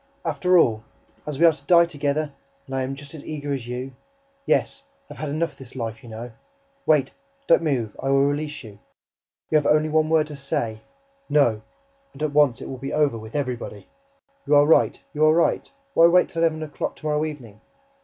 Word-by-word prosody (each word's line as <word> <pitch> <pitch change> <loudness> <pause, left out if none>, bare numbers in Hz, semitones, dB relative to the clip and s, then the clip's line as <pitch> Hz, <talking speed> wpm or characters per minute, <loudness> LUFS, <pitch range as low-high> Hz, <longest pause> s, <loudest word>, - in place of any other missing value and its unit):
"After 180 0 +2
all, 110 -9 +3 0.4
as 150 -2 -4
we 170 - +5
are 165 - +8
to 145 -3 -12
die 170 +3 +6
together... 145 -2 -2 0.3
and 135 - -9
I 130 - 0
am 130 +1 -3
just 140 +1 -11
as 155 - -9
eager 145 -2 -4
as 125 -4 -5
you... 125 +2 -5 0.5
yes, - - +1 0.3
I - - -10
have - - -15
had 155 - -3
enough 160 +3 -1
of - - -26
this 130 -1 -12
life, 115 -1 -5
you 120 - -13
know... 115 +2 -7 0.6
Wait, 150 -4 +3 0.3
don't - - +5
move, 125 -10 -1
I 135 - -2
will 135 0 +4
release 150 +1 -2
you... 105 -3 -12 0.7
You 155 - +5
have 145 - -2
only 155 +1 +3
one 155 0 +2
word 160 -1 +3
to 150 -1 -9
say: 115 -5 -3 0.5
'NO!' 120 -8 +3 0.5
And 140 - -13
it 150 -2 -1
will 150 0 +7
at 120 - -14
once 130 - -7
be 135 - -4
over 150 -5 +2
WITH 110 +3 -11
EVERYBODY!... 125 -7 -4 0.6
You 150 - +4
are 145 0 +6
right, 160 - +3
you 150 0 0
are 155 +1 +5
right; 170 - +1 0.2
why 165 - +7
wait 180 +1 +4
till 165 - -3
eleven 160 -1 +1
o'clock 150 -2 -4
to - - -14
morrow 150 0 +1
evening? 125 -9 -7
145 Hz, 215 wpm, -23 LUFS, 130-155 Hz, 0.7 s, are